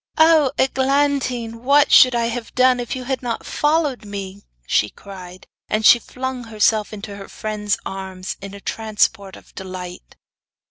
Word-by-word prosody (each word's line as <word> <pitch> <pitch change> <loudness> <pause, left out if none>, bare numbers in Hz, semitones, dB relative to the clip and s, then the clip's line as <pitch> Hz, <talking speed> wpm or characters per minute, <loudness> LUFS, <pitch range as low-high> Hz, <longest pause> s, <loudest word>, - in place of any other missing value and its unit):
'Oh, 315 -4 +5
Eglantine! 265 -3 0
what 280 +3 +4
should 255 -1 +7
I 235 -1 +1
have 230 0 -5
done 255 0 +4
if 245 +2 -4
you 255 - -5
had 265 +1 -3
not 235 -2 -4
followed 295 -5 0
me,' 200 -1 -7 0.2
she 105 - +1
cried. 185 - -12 0.2
And 215 0 0
she 240 - +8
flung 255 +1 -6
herself 215 -1 +1
into 205 -1 -8
her 195 - -9
friend's 210 -1 -2
arms 190 -1 -6
in 200 0 -8
a - - -10
transport 215 -3 -1
of - - -17
delight. 180 - -8
225 Hz, 155 wpm, -20 LUFS, 200-260 Hz, 0.2 s, she